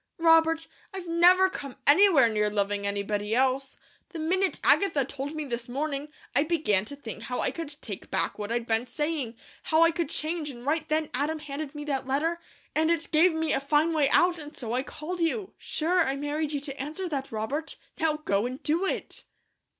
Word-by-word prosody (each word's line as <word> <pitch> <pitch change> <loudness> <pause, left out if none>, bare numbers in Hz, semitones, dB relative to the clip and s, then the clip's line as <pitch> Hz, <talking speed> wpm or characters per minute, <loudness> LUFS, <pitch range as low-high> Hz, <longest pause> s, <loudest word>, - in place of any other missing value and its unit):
Robert, 325 -1 +4 0.3
I've 375 -2 -5
never 355 +3 +5
come 280 -8 -7
anywhere 300 -4 +6
near 210 -1 +1
loving 205 0 -1
anybody 205 +1 -1
else. 265 +1 +1 0.3
The 355 - -8
minute 370 +4 0
Agatha 305 -9 +4
told 275 +3 -5
me 310 -1 -3
this 240 -2 -5
morning, 280 +2 -2 0.3
I 280 - +5
began 295 - +1
to 285 - -7
think 225 -6 -8
how 250 +2 -4
I - - +1
could 300 -3 -7
take 200 -5 -7
back - - -1
what 210 +1 -4
I'd 235 0 -1
been 230 +1 0
saying, 290 -2 -2 0.3
how 320 +1 +3
I 330 - +5
could 335 -3 -2
change, 315 -1 -1
and 245 -2 -9
right 310 +2 0
then 310 0 0
Adam 295 +5 0
handed 295 0 -6
me 295 - -5
that 270 -3 -2
letter, 320 +6 0 0.3
and 315 +1 +2
it 335 -1 0
gave 330 +3 +5
me 320 0 0
a - - +2
fine 295 +4 +2
way 295 -3 +3
out, 350 +1 +4
and 295 -1 -10
so 235 -2 -4
I 250 - +1
called 310 +6 -6
you. 375 +4 -1
Sure, 345 +4 0
I 270 -2 -1
married 295 +2 -2
you 290 -2 -2
to 275 -2 -6
answer 310 +7 -4
that, 275 -4 -4
Robert; 260 +9 -3 0.2
now 315 -1 +2
go 200 +4 +1
and 255 +2 -7
do 335 +6 +1
it." - - -4
295 Hz, 205 wpm, -27 LUFS, 255-325 Hz, 0.3 s, anywhere